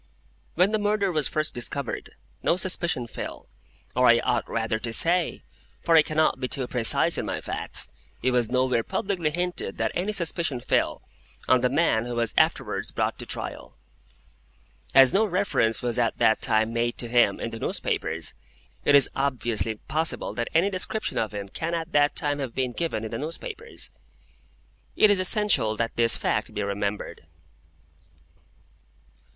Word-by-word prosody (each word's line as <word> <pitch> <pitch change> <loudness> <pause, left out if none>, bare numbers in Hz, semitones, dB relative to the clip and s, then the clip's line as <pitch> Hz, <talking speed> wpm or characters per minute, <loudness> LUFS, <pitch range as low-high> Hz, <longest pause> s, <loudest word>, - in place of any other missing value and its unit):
When 180 +4 +3
the 215 - +1
murder 205 -2 +1
was 155 -4 +1
first 155 0 -1
discovered, 120 +1 -3 0.3
no 175 - +2
suspicion 170 -8 -1
fell—or 125 +2 -4
I 120 - +7
ought - - 0
rather 115 -1 -1
to 115 +1 -3
say, 170 +8 +1 0.4
for 165 - +3
I 160 - +9
cannot 155 -1 +1
be 130 - -2
too 130 0 -2
precise 120 -2 +3
in - - -3
my - - -2
facts, - - -3 0.4
it 130 - +2
was 120 -3 +1
nowhere 125 -2 +2
publicly 175 - -1
hinted 175 +3 -3
that - - 0
any 190 +4 -1
suspicion 170 -8 -1
fell—on 125 +1 -1
the 125 - +2
man 135 -5 +2
who 120 0 -4
was 115 -2 0
afterwards - - +1
brought - - -2
to - - -6
trial. - - -7 1.2
As 135 -1 +8
no 205 - +4
reference 180 - +1
was 120 0 0
at 115 -2 +1
that 110 - +3
time 110 +1 +2
made 120 0 -1
to 120 - -2
him 120 0 +3
in 115 - -4
the 115 - -7
newspapers, - - -2 0.5
it 145 - +5
is 140 -3 +8
obviously 120 -5 -1
impossible 155 +9 -2
that 120 -1 -3
any 185 +5 +3
description 195 +3 -2
of 110 - -1
him 100 -1 -5
can 165 +11 -3
at 165 0 -4
that 145 0 +3
time 145 -2 -1
have 130 -4 -5
been 130 -2 0
given 160 -5 -3
in 110 - -5
the 115 - -4
newspapers. 445 - -6 1.0
It 215 - +6
is 200 - +3
essential 185 - +2
that 115 0 -2
this 115 -1 +3
fact 105 +1 -1
be 105 - -1
remembered. 100 -5 -4
130 Hz, 165 wpm, -25 LUFS, 115-170 Hz, 1.2 s, I